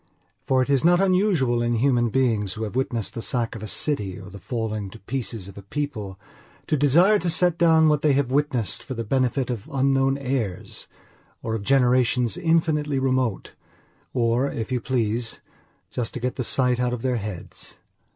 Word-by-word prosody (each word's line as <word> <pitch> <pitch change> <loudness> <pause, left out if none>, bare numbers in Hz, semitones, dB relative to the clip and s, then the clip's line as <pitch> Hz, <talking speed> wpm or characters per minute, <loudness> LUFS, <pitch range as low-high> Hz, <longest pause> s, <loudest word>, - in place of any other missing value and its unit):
For 130 -1 +3
it 130 - -7
is 135 -2 +3
not 175 +1 +5
unusual 185 - +2
in 120 0 +1
human 120 -1 +2
beings 110 -6 +1
who 110 - -4
have 110 +1 -5
witnessed 115 -6 -1
the 115 - -5
sack 120 -2 -1
of 115 - -7
a 110 - -5
city 105 -6 -2
or 95 0 -11
the 100 - -10
falling 110 -2 -3
to 105 - -12
pieces 115 -4 -4
of 100 0 -10
a - - -9
people 105 -4 -5 0.5
to - - +1
desire 170 +9 +4
to 180 - -1
set 175 0 +2
down 160 -2 +5
what 150 -1 +2
they 150 -2 +3
have 135 -2 0
witnessed 135 -6 0
for 130 - -7
the 115 - -3
benefit 130 +2 0
of 115 +2 -6
unknown 135 0 +2
heirs 125 -9 -4 0.6
or 110 - -2
of 110 - -2
generations 125 -1 +2
infinitely 160 -3 +1
remote; 130 -5 0 0.6
or, 120 +2 +1
if 115 +2 -5
you 125 -2 0
please, 115 -1 -1 0.5
just 120 -2 -3
to - - -3
get 125 +1 -2
the 130 - -2
sight 125 0 +1
out 125 0 0
of 120 - -5
their 125 -2 +1
heads. 105 -4 -7
125 Hz, 190 wpm, -24 LUFS, 115-140 Hz, 0.6 s, not